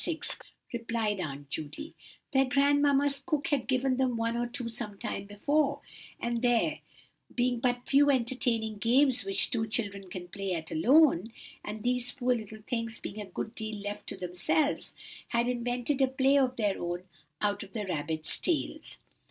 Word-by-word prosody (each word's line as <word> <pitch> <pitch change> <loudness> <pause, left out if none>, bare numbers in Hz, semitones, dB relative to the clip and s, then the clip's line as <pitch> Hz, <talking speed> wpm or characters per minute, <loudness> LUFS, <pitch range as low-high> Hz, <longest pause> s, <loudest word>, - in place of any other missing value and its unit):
6," 320 -2 -3 0.3
replied 230 -3 -1
Aunt 145 -4 -5
Judy; 160 - -5 0.4
"their 270 -2 +4
grandmamma's 280 +1 +3
cook 310 -1 -1
had 280 -5 0
given 255 0 +1
them 255 -3 +1
one 230 +1 0
or 240 0 0
two 245 0 -4
sometime 210 -4 -4
before, 280 +9 +1 0.4
and 235 -1 -1
there 245 +5 +2 0.6
being 245 -1 +1
but 245 0 0
few 285 +1 +5
entertaining 235 -4 +1
games 250 +1 +5
which 195 0 +3
two 220 -2 0
children 200 -3 -2
can 180 -1 -6
play 195 0 -3
at 160 -1 -5
alone, 235 - +5 0.3
and 210 0 -6
these 250 0 +1
poor 250 -2 +1
little 215 -2 -6
things 230 -1 -2
being 210 +2 -6
a - - -5
good 205 +4 -5
deal 220 -2 -3
left 205 0 -6
to - - -3
themselves, 185 - 0 0.4
they 235 - +3
invented 245 +3 -1
a 265 - +6
play 265 +1 +3
of 260 -2 +3
their 205 -4 0
own 175 +1 -3 0.4
out 205 -1 0
of 195 -1 -9
the 215 -3 -3
rabbits' 155 -2 -1
tails. 340 -4 -2
235 Hz, 165 wpm, -30 LUFS, 205-265 Hz, 0.6 s, a